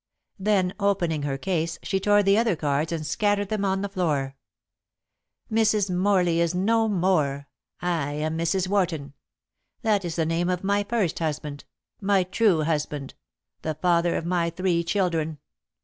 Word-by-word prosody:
Then 190 Hz, -2 st, +1 dB
opening 185 Hz, -6 st, +1 dB
her 140 Hz, -1 st, -2 dB
case 170 Hz, +1 st, -1 dB
she 195 Hz, -, 0 dB
tore 205 Hz, +1 st, +4 dB
the 195 Hz, 0 st, +4 dB
other 225 Hz, -3 st, +2 dB
cards 150 Hz, +1 st, -1 dB
and 160 Hz, -2 st, -3 dB
scattered 205 Hz, +4 st, 0 dB
them 215 Hz, -2 st, -1 dB
on 195 Hz, 0 st, 0 dB
the -, -, -1 dB
floor. 150 Hz, -9 st, -1 dB, 1.2 s
"Mrs. 215 Hz, -3 st, +2 dB
Morley 180 Hz, -3 st, +2 dB
is 170 Hz, +1 st, +1 dB
no 225 Hz, +4 st, +2 dB
more. 165 Hz, -8 st, +1 dB, 0.4 s
I 160 Hz, -5 st, -1 dB
am 155 Hz, +2 st, -2 dB
Mrs. 170 Hz, +3 st, 0 dB
Warton. 170 Hz, -8 st, -1 dB, 0.7 s
That 210 Hz, -3 st, +2 dB
is 170 Hz, -2 st, -4 dB
the 165 Hz, -, +1 dB
name 165 Hz, +2 st, 0 dB
of 180 Hz, 0 st, -1 dB
my 200 Hz, +1 st, +1 dB
first 205 Hz, -5 st, -1 dB
husband 150 Hz, -2 st, -4 dB, 0.3 s
my 195 Hz, -2 st, +2 dB
true 185 Hz, -2 st, +2 dB
husband 150 Hz, -3 st, -2 dB, 0.5 s
the 155 Hz, -1 st, -3 dB
father 170 Hz, +1 st, +2 dB
of -, -, -2 dB
my 170 Hz, -1 st, +1 dB
three 170 Hz, 0 st, 0 dB
children. 165 Hz, -4 st, 0 dB
175 Hz, 155 wpm, -25 LUFS, 160-200 Hz, 1.2 s, tore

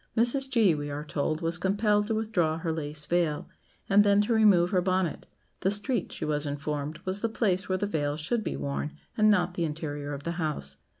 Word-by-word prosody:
Mrs. 265 Hz, +4 st, +2 dB
G., 225 Hz, -8 st, +4 dB
we 145 Hz, -1 st, -4 dB
are 145 Hz, +1 st, -4 dB
told, 155 Hz, +1 st, -2 dB
was 165 Hz, +1 st, 0 dB
compelled 205 Hz, +2 st, +2 dB
to 220 Hz, -, 0 dB
withdraw 180 Hz, -8 st, 0 dB
her 165 Hz, -1 st, -2 dB
lace 150 Hz, -1 st, -4 dB
veil, 170 Hz, -3 st, 0 dB, 0.4 s
and 205 Hz, +1 st, +6 dB
then 200 Hz, 0 st, +4 dB
to 210 Hz, +3 st, +1 dB
remove 200 Hz, -6 st, +5 dB
her 185 Hz, -, +3 dB
bonnet; 185 Hz, -3 st, -1 dB, 0.3 s
the 190 Hz, -, +1 dB
street, 205 Hz, +4 st, -1 dB
she -, -, -5 dB
was 150 Hz, 0 st, 0 dB
informed, 145 Hz, +1 st, -3 dB
was 190 Hz, +2 st, -1 dB
the 230 Hz, -, 0 dB
place 195 Hz, -4 st, 0 dB
where 185 Hz, -, +1 dB
the 205 Hz, -, -1 dB
veil 150 Hz, -6 st, -1 dB
should 220 Hz, +9 st, -1 dB
be 165 Hz, -, -3 dB
worn, 140 Hz, +2 st, -3 dB, 0.2 s
and 215 Hz, 0 st, +4 dB
not 180 Hz, -4 st, +3 dB
the 175 Hz, -, -2 dB
interior 150 Hz, -2 st, -4 dB
of 140 Hz, -, -9 dB
the 170 Hz, -, -2 dB
house. 70 Hz, -, -3 dB
175 Hz, 215 wpm, -28 LUFS, 150-205 Hz, 0.4 s, and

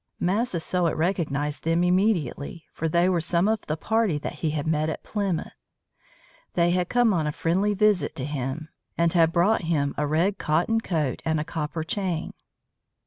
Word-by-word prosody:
Massasoit 180 Hz, -4 st, 0 dB
recognized 155 Hz, -4 st, -1 dB
them 165 Hz, +2 st, +2 dB
immediately, 180 Hz, -, 0 dB
for 165 Hz, -, -2 dB
they 170 Hz, +3 st, +3 dB
were 180 Hz, -2 st, +2 dB
some 170 Hz, +4 st, +2 dB
of 220 Hz, -1 st, +1 dB
the 155 Hz, -, -1 dB
party 220 Hz, -4 st, +1 dB
that 145 Hz, -, -5 dB
he 160 Hz, -, +1 dB
had 150 Hz, -1 st, -2 dB
met 155 Hz, 0 st, +1 dB
at 160 Hz, -, -5 dB
Plymouth. 200 Hz, -5 st, -2 dB, 1.0 s
They 170 Hz, 0 st, +3 dB
had 180 Hz, 0 st, 0 dB
come 240 Hz, -3 st, +3 dB
on 160 Hz, -4 st, 0 dB
a -, -, 0 dB
friendly 190 Hz, +7 st, 0 dB
visit 210 Hz, -2 st, +2 dB
to 130 Hz, -, -3 dB
him, 145 Hz, +2 st, -4 dB, 0.3 s
and 170 Hz, -1 st, +2 dB
had 165 Hz, -2 st, +4 dB
brought 180 Hz, +6 st, +3 dB
him 145 Hz, -4 st, 0 dB
a 150 Hz, -, +1 dB
red 170 Hz, +7 st, +1 dB
cotton 175 Hz, +9 st, +1 dB
coat 155 Hz, -, -1 dB
and 160 Hz, -1 st, 0 dB
a -, -, -1 dB
copper 155 Hz, 0 st, -3 dB
chain. 180 Hz, -1 st, -2 dB
170 Hz, 175 wpm, -25 LUFS, 155-190 Hz, 1.0 s, had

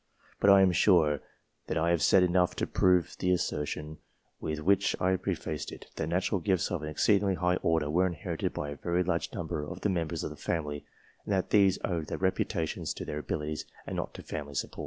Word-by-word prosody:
But 100 Hz, -, +4 dB
I 100 Hz, 0 st, +8 dB
am 95 Hz, -, +4 dB
sure 80 Hz, -5 st, +4 dB, 0.5 s
I 85 Hz, +1 st, +1 dB
have 85 Hz, -3 st, +2 dB
said 95 Hz, +5 st, +5 dB
enough 90 Hz, 0 st, +2 dB
to -, -, -1 dB
prove 90 Hz, -3 st, +2 dB
the 90 Hz, -, 0 dB
assertion 75 Hz, -3 st, -2 dB, 0.4 s
with 80 Hz, 0 st, -3 dB
which 100 Hz, +5 st, +2 dB
I 95 Hz, +1 st, +2 dB
prefaced 75 Hz, -4 st, -3 dB
it, -, -, -11 dB
that 75 Hz, -, -2 dB
natural 90 Hz, +3 st, 0 dB
gifts 95 Hz, -3 st, +1 dB
of 90 Hz, -, -2 dB
an 75 Hz, -, -4 dB
exceedingly 100 Hz, +4 st, +2 dB
high 90 Hz, +1 st, +1 dB
order 80 Hz, -4 st, +1 dB
were 90 Hz, +5 st, +2 dB
inherited 85 Hz, -5 st, -3 dB
by 75 Hz, 0 st, -4 dB
a 75 Hz, -, -7 dB
very 85 Hz, +3 st, 0 dB
large 85 Hz, -2 st, -1 dB
number 75 Hz, -, -3 dB
of 75 Hz, -, -7 dB
the 105 Hz, -, +1 dB
members 85 Hz, -4 st, -2 dB
of -, -, -3 dB
the -, -, -8 dB
family, 75 Hz, -3 st, -3 dB, 0.4 s
and 105 Hz, -, -2 dB
that 95 Hz, -1 st, 0 dB
these 100 Hz, -3 st, +5 dB
owed 85 Hz, -4 st, -2 dB
their -, -, -3 dB
reputations 95 Hz, -3 st, -1 dB
to -, -, -6 dB
their 75 Hz, -, -4 dB
abilities, 75 Hz, +1 st, -3 dB, 0.2 s
and -, -, -5 dB
not -, -, -4 dB
to -, -, -8 dB
family 70 Hz, -1 st, -6 dB
support. -, -, -3 dB
85 Hz, 210 wpm, -30 LUFS, 75-95 Hz, 0.5 s, I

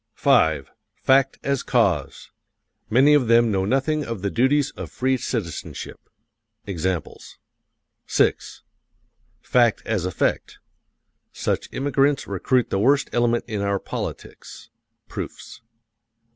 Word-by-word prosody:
V. 80 Hz, -3 st, +3 dB, 0.3 s
FACT 135 Hz, 0 st, +2 dB
AS 140 Hz, -2 st, 0 dB
CAUSE: -, -, 0 dB, 0.6 s
Many 135 Hz, +6 st, +5 dB
of 140 Hz, -5 st, +3 dB
them 115 Hz, 0 st, +4 dB
know 95 Hz, -1 st, 0 dB
nothing 135 Hz, +6 st, 0 dB
of 115 Hz, -7 st, -6 dB
the 100 Hz, -, -1 dB
duties 135 Hz, +4 st, +2 dB
of -, -, -8 dB
free 130 Hz, +1 st, 0 dB
citizenship. 105 Hz, -, -5 dB, 0.7 s
(Examples.) 95 Hz, -2 st, -4 dB, 0.7 s
VI.FACT 120 Hz, -3 st, -1 dB
AS 100 Hz, -6 st, -1 dB
EFFECT: 90 Hz, -, -1 dB, 0.7 s
Such -, -, -2 dB
immigrants 140 Hz, +1 st, +1 dB
recruit 120 Hz, +6 st, 0 dB
the 95 Hz, -, 0 dB
worst 140 Hz, +6 st, +2 dB
element 120 Hz, 0 st, +1 dB
in 105 Hz, -2 st, -3 dB
our 100 Hz, 0 st, 0 dB
politics. -, -, -8 dB, 0.4 s
(Proofs.) -, -, -8 dB
120 Hz, 105 wpm, -23 LUFS, 100-135 Hz, 0.7 s, Many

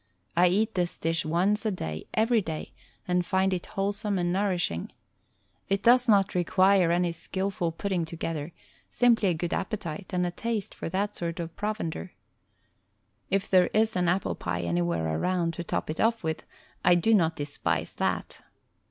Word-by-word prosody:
I 180 Hz, -, +5 dB
eat 210 Hz, +5 st, +1 dB
this 175 Hz, -2 st, -1 dB
dish 165 Hz, 0 st, 0 dB
once 185 Hz, +7 st, +1 dB
a 220 Hz, -, +1 dB
day 80 Hz, -, -5 dB
every 225 Hz, +1 st, +3 dB
day 160 Hz, -4 st, -6 dB, 0.3 s
and 180 Hz, 0 st, +2 dB
find 190 Hz, +1 st, +1 dB
it 180 Hz, -, -3 dB
wholesome 200 Hz, +1 st, -1 dB
and 175 Hz, -1 st, 0 dB
nourishing. 180 Hz, -, -1 dB, 0.8 s
It 195 Hz, 0 st, 0 dB
does 245 Hz, +1 st, +5 dB
not 200 Hz, -2 st, +4 dB
require 185 Hz, 0 st, +4 dB
any 175 Hz, 0 st, +2 dB
skillful 190 Hz, +1 st, -2 dB
putting 180 Hz, 0 st, -2 dB
to 160 Hz, -, -8 dB
gether, 160 Hz, -1 st, -4 dB, 0.4 s
simply 230 Hz, -5 st, +3 dB
a 175 Hz, -, +1 dB
good 170 Hz, +2 st, -3 dB
appetite 185 Hz, -4 st, -4 dB
and 180 Hz, -1 st, +1 dB
a 175 Hz, -, -1 dB
taste 220 Hz, +2 st, -3 dB
for -, -, -5 dB
that 200 Hz, +4 st, -1 dB
sort 170 Hz, -1 st, -3 dB
of 165 Hz, -1 st, -5 dB
provender. 205 Hz, -4 st, -3 dB, 1.2 s
If 195 Hz, 0 st, +1 dB
there 185 Hz, -2 st, +5 dB
is 220 Hz, +1 st, +3 dB
an 180 Hz, -1 st, +2 dB
apple 180 Hz, +2 st, 0 dB
pie 90 Hz, 0 st, -3 dB
an}rwhere 85 Hz, -2 st, 0 dB
around 175 Hz, -, 0 dB
to 170 Hz, -, -5 dB
top -, -, -2 dB
it 155 Hz, -, -4 dB
off 225 Hz, -1 st, +2 dB
with, 160 Hz, 0 st, -3 dB, 0.4 s
I 175 Hz, -, +6 dB
do 180 Hz, +6 st, +3 dB
not 165 Hz, -6 st, +3 dB
despise 145 Hz, 0 st, -2 dB
that. -, -, -2 dB
180 Hz, 170 wpm, -27 LUFS, 165-200 Hz, 1.2 s, I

